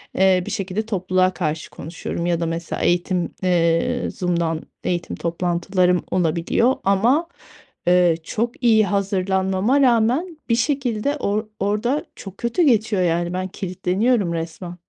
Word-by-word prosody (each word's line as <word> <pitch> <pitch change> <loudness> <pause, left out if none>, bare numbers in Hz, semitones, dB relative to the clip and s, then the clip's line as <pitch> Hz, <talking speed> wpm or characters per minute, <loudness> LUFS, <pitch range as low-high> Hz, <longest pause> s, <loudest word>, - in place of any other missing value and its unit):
eee, 190 -1 +4
bir - - -5
şekilde 195 +2 -2
topluluğa 185 -3 +1
karşı 160 -3 -3
konuşuyorum 170 +1 -5
ya 175 -1 +1
da 170 - -1
mesela 165 +1 -4
eğitim, 175 0 +1
eee, 175 +7 +1
Zoom’dan 170 -3 -1 0.2
eğitim 175 -1 -2
toplantılarım 180 +1 0
olabiliyor 180 +8 +1
ama, 235 - +2 0.6
eee, 175 -2 +5
çok 235 +8 -3
iyi 220 -3 +5
hazırlanmama 195 +5 +1
rağmen 255 +8 +2
bir 230 - +4
şekilde 265 0 0
or 210 -2 -1
orada 210 +8 0
çok 195 -1 -10
kötü 235 +9 0
geçiyor, 220 -7 +2
yani, 175 0 0
ben 185 +1 -2
kilitleniyorum 190 +2 0
resmen. 170 +2 -5
190 Hz, 130 wpm, -21 LUFS, 175-225 Hz, 0.6 s, eee